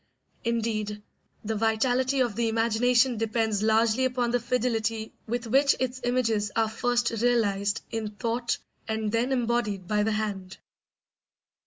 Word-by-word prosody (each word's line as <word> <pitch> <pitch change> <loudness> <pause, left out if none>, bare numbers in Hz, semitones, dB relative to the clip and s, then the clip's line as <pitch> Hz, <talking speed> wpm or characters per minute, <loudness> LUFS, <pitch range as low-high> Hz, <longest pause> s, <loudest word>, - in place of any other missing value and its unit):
Indeed, 215 -3 -2 0.4
the 220 - -1
vitality 245 +5 +1
of 240 -5 0
the 230 0 +1
imagination 235 +2 +2
depends 220 -1 0
largely 220 +3 +3
upon 250 -2 0
the 245 - +2
fidelity 225 -2 -1
with 240 +1 -2
which 275 +5 +4
its 255 0 -2
images 230 -4 +1
are 225 -1 +2
first 245 0 0
realised 210 -4 +1
in 220 -1 -3
thought 235 +2 -1 0.3
and 220 -1 -1
then 235 +4 0
embodied 235 -7 0
by 210 +1 +1
the 220 +1 +1
hand. 200 -3 -3
225 Hz, 135 wpm, -27 LUFS, 215-245 Hz, 0.4 s, which